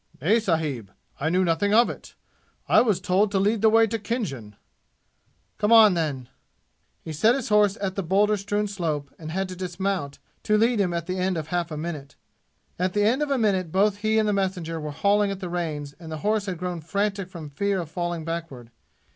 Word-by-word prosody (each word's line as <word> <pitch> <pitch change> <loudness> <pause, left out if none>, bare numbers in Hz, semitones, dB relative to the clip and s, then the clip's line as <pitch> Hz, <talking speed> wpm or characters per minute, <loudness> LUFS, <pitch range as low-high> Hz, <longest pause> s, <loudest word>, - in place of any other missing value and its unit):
"Nay, 205 - +3
sahib; 155 - -1 0.3
I 155 - 0
knew 185 +3 +2
nothing 190 +5 +1
of 235 +1 +6
it! - - -9 0.5
I - - +6
was 215 -7 +1
told 190 +3 +2
to 200 - -1
lead 205 +2 +1
the 220 - +6
way 225 +1 +5
to 225 +1 -3
Khinjan." 165 - -4 1.0
"Come 210 - +1
on, 220 -4 +8
then!" 145 -7 -2 0.8
He 160 - -6
set 220 +11 +3
his 265 -5 -4
horse 210 -2 +3
at 195 -2 -2
the 195 - -2
boulder 200 +4 +2
strewn 205 +1 -2
slope 160 -8 -3
and 155 -1 -7
had 190 +4 -2
to 185 - -6
dismount 180 -4 -3 0.2
to 215 - +2
lead 230 +1 +2
him 185 -3 +1
at 170 -1 -3
the 185 +1 -3
end 185 -1 0
of 155 -1 -5
half 175 -1 -1
a 155 - -5
minute. 150 -3 -6 0.6
At 180 0 0
the 205 - +2
end 240 +7 +2
of 295 - 0
a 275 - +1
minute 190 -7 +1
both 200 +2 +2
he 215 +1 0
and 215 -1 +2
the 210 - +1
messenger 185 -4 -2
were 150 -1 -5
hauling 200 +7 +2
at 195 -1 -4
the 185 -3 -5
reins 155 -5 -4
and 165 -2 -9
the 155 - -4
horse 210 -1 +1
had 185 -2 -3
grown 180 -1 -4
frantic 195 +3 -2
from 165 -6 -9
fear 200 +6 -1
of 165 -3 -6
falling 175 -2 -3
backward. 160 -8 -6
185 Hz, 215 wpm, -25 LUFS, 160-210 Hz, 1.0 s, on